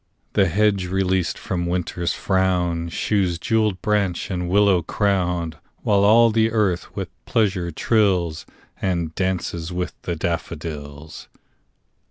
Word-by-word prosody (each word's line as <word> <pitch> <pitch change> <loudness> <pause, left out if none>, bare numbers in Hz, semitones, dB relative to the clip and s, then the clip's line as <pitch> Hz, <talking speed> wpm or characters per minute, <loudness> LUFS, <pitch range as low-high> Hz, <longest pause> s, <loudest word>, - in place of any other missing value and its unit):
The 100 -2 +4
hedge 100 +1 +2
released 95 -2 0
from 85 -2 -3
Winter's 85 -1 -1
frown 90 -3 0
Shews 95 -1 0
jewelled 105 -1 0
branch 100 -4 0
and 90 -1 -2
willow 100 -1 +4
crown; 90 -3 0 0.3
While 100 -1 +3
all 115 +3 +6
the 110 0 +3
earth 100 -6 0
with - - -4 0.2
pleasure 95 -6 +1
trills, 90 -4 +1 0.3
And 85 -4 -1
'dances 90 -2 -2
with 90 0 -3
the 85 - -3
daffodils. 80 -2 -5
90 Hz, 120 wpm, -22 LUFS, 85-100 Hz, 0.3 s, all